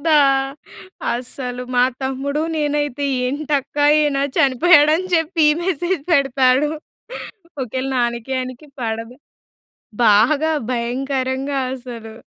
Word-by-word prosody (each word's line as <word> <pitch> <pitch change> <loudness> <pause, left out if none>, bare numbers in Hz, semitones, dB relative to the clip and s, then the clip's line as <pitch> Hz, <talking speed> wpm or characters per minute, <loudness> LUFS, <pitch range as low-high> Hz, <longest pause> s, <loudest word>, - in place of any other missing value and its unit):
గదా! 315 0 +3 1.0
అస్సలు. 250 0 -5
మా 245 0 +5 0.2
తమ్ముడూ 275 +3 -2
నేనైతే 290 -2 -1 0.2
ఏంటక్కా 290 +1 -1
ఈయన 295 -2 +1 0.2
చనిపోయాడని 305 +4 +5
చెప్పి 325 0 +1
ఈ - - +4
మెసేజ్ 355 -2 -1
పెడతాడూ. 270 0 +3 0.9
ఒకవేళ 255 +2 -4
నానకీ 235 0 -1
ఆయనికి 255 +3 -7
పడదు 225 +1 -4 0.9
బాగా 250 +10 +4 0.2
భయంకరంగా 260 +3 -2 0.2
అసలూ. 240 -4 -9
270 Hz, 95 wpm, -20 LUFS, 250-295 Hz, 1.0 s, మా